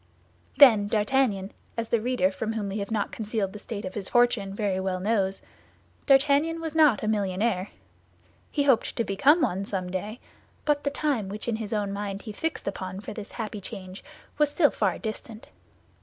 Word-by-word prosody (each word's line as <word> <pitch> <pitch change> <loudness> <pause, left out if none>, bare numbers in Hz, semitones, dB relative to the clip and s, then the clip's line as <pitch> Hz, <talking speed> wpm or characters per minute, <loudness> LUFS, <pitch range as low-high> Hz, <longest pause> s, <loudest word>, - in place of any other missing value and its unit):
Then 225 -8 +8
D'Artagnan, 210 -2 +1 0.3
as 230 -1 -2
the 235 - +2
reader, 235 -6 +1
from 220 +3 -3
whom 210 -3 -3
we 200 +2 -3
have 200 - -4
not 215 -2 -1
concealed 210 -3 -2
the 210 - -8
state 210 -1 -6
of 185 - -5
his 200 -3 -4
fortune, 240 -5 +3
very 195 -2 -1
well 190 -1 -2
knows—D'Artagnan 270 - 0
was 325 -2 -4
not 305 -9 +4
a - - -1
millionaire; 200 -1 0 0.8
he 290 - 0
hoped 265 -5 +2
to 230 - +1
become 270 - +4
one 195 - 0
someday, 190 +3 -4 0.5
but 295 -1 +1
the - - +3
time 280 -8 -1
which 210 +3 -6
in 230 -2 0
his 220 -2 -5
own 205 -2 -1
mind 200 -1 -4
he 215 - -6
fixed 320 +6 -4
upon 185 -1 -4
for 210 - -7
this 210 -1 -8
happy 215 -3 -5
change 190 -1 -8 0.4
was 300 -1 +4
still 290 0 +3
far - - 0
distant. 220 0 -7
215 Hz, 180 wpm, -26 LUFS, 195-245 Hz, 0.8 s, Then